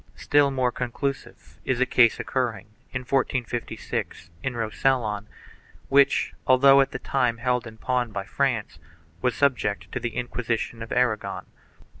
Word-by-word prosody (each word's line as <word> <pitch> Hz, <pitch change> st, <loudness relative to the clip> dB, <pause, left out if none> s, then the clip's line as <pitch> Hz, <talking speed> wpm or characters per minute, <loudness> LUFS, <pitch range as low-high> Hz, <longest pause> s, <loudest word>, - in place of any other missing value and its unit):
Still 145 Hz, -1 st, +3 dB
more 130 Hz, -2 st, 0 dB
conclusive 130 Hz, +3 st, -5 dB
is 130 Hz, -2 st, -1 dB
a 130 Hz, -, +4 dB
case 120 Hz, -2 st, +4 dB
occurring, 115 Hz, -6 st, -2 dB, 0.3 s
in 125 Hz, -, -3 dB
1456, 120 Hz, -, -2 dB
in 125 Hz, +2 st, -3 dB
Rosellon, 110 Hz, -2 st, 0 dB, 0.6 s
which, 140 Hz, 0 st, +4 dB
although 135 Hz, +1 st, +7 dB
at 135 Hz, -, +1 dB
the -, -, -5 dB
time 125 Hz, -3 st, 0 dB
held 125 Hz, 0 st, 0 dB
in 110 Hz, 0 st, -11 dB
pawn 125 Hz, 0 st, -1 dB
by 100 Hz, -1 st, -3 dB
France, 125 Hz, -3 st, -1 dB, 0.4 s
was 125 Hz, -2 st, +1 dB
subject 125 Hz, -7 st, 0 dB
to -, -, -3 dB
the 120 Hz, -, -4 dB
Inquisition 120 Hz, -1 st, -3 dB
of 115 Hz, -, -7 dB
Aragon. 125 Hz, -4 st, 0 dB
125 Hz, 140 wpm, -25 LUFS, 115-130 Hz, 0.6 s, although